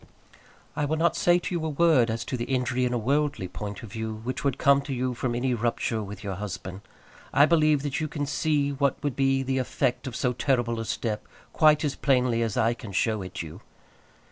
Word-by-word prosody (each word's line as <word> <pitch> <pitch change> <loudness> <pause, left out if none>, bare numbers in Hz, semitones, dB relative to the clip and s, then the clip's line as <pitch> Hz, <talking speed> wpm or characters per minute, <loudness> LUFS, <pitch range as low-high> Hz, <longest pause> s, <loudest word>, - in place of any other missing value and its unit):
I 150 - 0
will 155 +2 -1
not 170 +2 +2
say 175 0 +4
to 180 +2 -4
you 170 -2 -1
a 160 - -1
word 150 -6 +4
as 115 +1 -2
to - - -3
the 120 -1 -3
injury 125 -1 0
in 125 - -1
a - - +1
worldly 140 -3 0
point 105 +5 -7
of 110 - -9
view 110 0 -4
which 130 +2 -4
would 140 -2 0
come 140 0 +4
to 140 0 -5
you 125 0 -1
from 120 0 -2
any 125 +1 0
rupture 115 -1 -1
with 100 0 -8
your 100 -1 -3
husband. 95 -1 -6 0.5
I 145 - +6
believe 155 -3 +3
that 145 -2 -2
you 155 - -1
can 145 -1 -3
see 145 -1 0
what 140 -1 +1
would 145 -3 -1
be 135 -1 +2
the 130 0 0
effect 125 0 -1
of 125 - -5
so 125 -1 0
terrible 120 -3 0
a 115 - -3
step 110 0 -3 0.3
quite 155 -1 +4
as 145 - 0
plainly 125 -4 +2
as 115 -3 -1
I 115 +1 +3
can 115 -4 -9
show 110 +2 +1
it 90 -2 -6
you. 80 +5 -10
125 Hz, 225 wpm, -26 LUFS, 115-145 Hz, 0.5 s, I